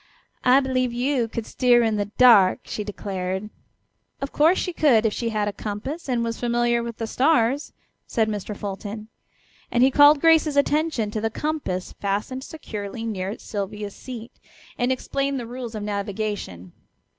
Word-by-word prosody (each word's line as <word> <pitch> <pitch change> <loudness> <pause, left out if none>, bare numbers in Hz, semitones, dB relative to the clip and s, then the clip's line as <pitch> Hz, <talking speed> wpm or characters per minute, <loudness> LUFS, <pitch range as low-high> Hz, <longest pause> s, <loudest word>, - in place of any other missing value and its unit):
"I 255 +2 +6
believe 255 -2 0
you 245 0 0
could 225 0 -5
steer 245 -2 +3
in 220 -1 +1
the 205 -1 0
dark," 205 -3 +5
she 210 - -5
declared. 195 0 -4 0.7
"Of 275 - -4
course 320 +5 +4
she 360 - -2
could 250 -9 +4
if 215 - +2
she 235 - -2
had 210 -2 -1
a 205 - -2
compass 260 +12 -5
and 240 -2 +1
was 230 -1 -3
familiar 240 0 +1
with 235 -1 -6
the 225 - -3
stars," 270 +1 +2 0.4
said 225 -3 +1
Mr. 210 -1 -4
Fulton; 205 +2 -6 0.6
and 240 - +3
he 265 - +5
called 290 +1 +7
Grace's 320 -2 +4
attention 285 -6 +1
to 215 - -3
the 225 - 0
compass 230 -9 -3
fastened 210 +6 -2
securely 225 -8 -6
near 200 -2 -3
Sylvia's 205 0 -5
seat, 235 -3 -8 0.4
and 245 +1 0
explained 275 +1 -1
the 240 - -5
rules 240 -1 -7
of 210 - -4
navigation. 200 - -4
230 Hz, 165 wpm, -24 LUFS, 210-260 Hz, 0.7 s, called